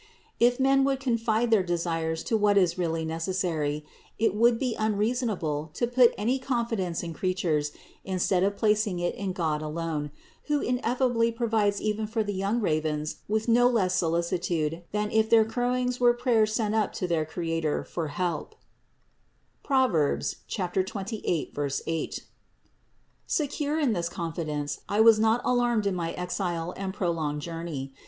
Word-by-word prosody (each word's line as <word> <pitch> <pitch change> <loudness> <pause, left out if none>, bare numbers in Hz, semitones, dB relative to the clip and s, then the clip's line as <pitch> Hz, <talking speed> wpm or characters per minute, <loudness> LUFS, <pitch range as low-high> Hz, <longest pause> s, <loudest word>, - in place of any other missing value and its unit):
If 245 +2 +4
men 270 +1 +4
would 270 -1 +1
confine 230 -2 0
their 220 -3 +5
de 175 -1 -1
sires 165 -1 -2
to 225 - 0
what 205 -1 +3
is 180 -3 +3
really 165 -2 -1
necessary, 160 -3 -2 0.3
it 220 -3 +2
would 230 +2 +4
be 250 -1 -1
unreasonable 210 - -1
to - - +1
put 245 0 +4
any 240 +6 0
confidence 230 -10 -1
in 165 -1 -5
creatures 160 -5 0 0.3
instead 185 -1 +1
of 200 +1 +1
placing 210 -3 +2
it 175 0 -1
in 195 -2 -3
God 160 -4 -1
alone, 155 -1 -3 0.4
who 295 -1 +1
ineffably 245 -2 +1
provides 220 -3 +1
even 215 0 -1
for 220 0 -1
the 205 -1 -3
young 200 +5 0
ravens 155 -5 -1
with 220 +2 -1
no 245 +1 +5
less 195 -7 +1
solicitude 170 -1 0
than 210 +1 -1
if 220 0 +2
their 225 -2 +6
Growings 250 +2 -1
were 240 -1 +5
prayers 230 -3 +2
sent 215 -1 0
up 220 -2 +1
to 180 - -2
their 165 -3 +1
Creator 165 -1 -2
for 165 -3 -4
help 175 - -3 1.1
(Prov. 260 -3 +2 0.6
28, 185 - -2
8). 160 - -3 1.1
Secure 295 0 -1
in 275 -7 +2
this 170 -3 -1
confidence, 155 -4 -3
I 205 - 0
was 220 -1 +7
not 225 +2 +3
alarmed 240 -3 +2
in 200 - +1
my 170 -2 -2
exile 180 -1 -3
and 195 -1 -4
prolonged 160 -6 -2
journey. 165 -5 -5
200 Hz, 150 wpm, -27 LUFS, 165-230 Hz, 1.1 s, was